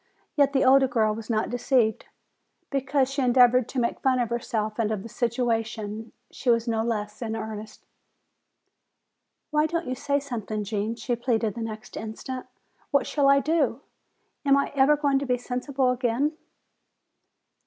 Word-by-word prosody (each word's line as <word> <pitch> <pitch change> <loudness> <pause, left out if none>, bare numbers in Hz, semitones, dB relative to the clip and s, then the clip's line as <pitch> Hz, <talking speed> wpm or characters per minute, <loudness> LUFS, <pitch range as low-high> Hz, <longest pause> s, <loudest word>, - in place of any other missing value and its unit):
Yet 280 -2 +4
the 270 - +3
older 265 +1 +6
girl 220 -4 +1
was 220 +1 -8
not 220 -1 0
deceived. 245 -2 +1 0.7
Because 275 -1 +1
she 275 - -1
endeavored 250 -1 +5
to 265 - -2
make 235 - -1
fun 260 -1 +2
of 240 -2 -1
herself 220 -2 -2
and 220 -2 +1
of 205 -3 -3
the 230 - -9
situation, 225 -2 -2 0.2
she 255 - -3
was 230 0 +3
no 225 -1 +1
less 210 -2 -3
in 225 -2 -3
earnest. 215 -1 -7 1.7
"Why 300 +1 +3
don't 335 +1 -2
you 255 - -2
say 280 +2 0
something, 225 -6 -4
Gene?" 210 +2 -2
she 240 +1 -2
pleaded 230 -3 0
the 230 - -6
next 220 -1 -7
instant. 225 +4 -6 0.4
"What 280 -3 +2
shall 280 -2 +2
I 275 0 +5
do? 290 -5 +1 0.6
Am 280 -1 +4
I 280 - 0
ever 285 +2 +4
going 285 -2 +2
to 280 - -3
be 250 -1 +2
sensible 255 +1 -1
again?" 250 +5 0
245 Hz, 165 wpm, -26 LUFS, 220-275 Hz, 1.7 s, older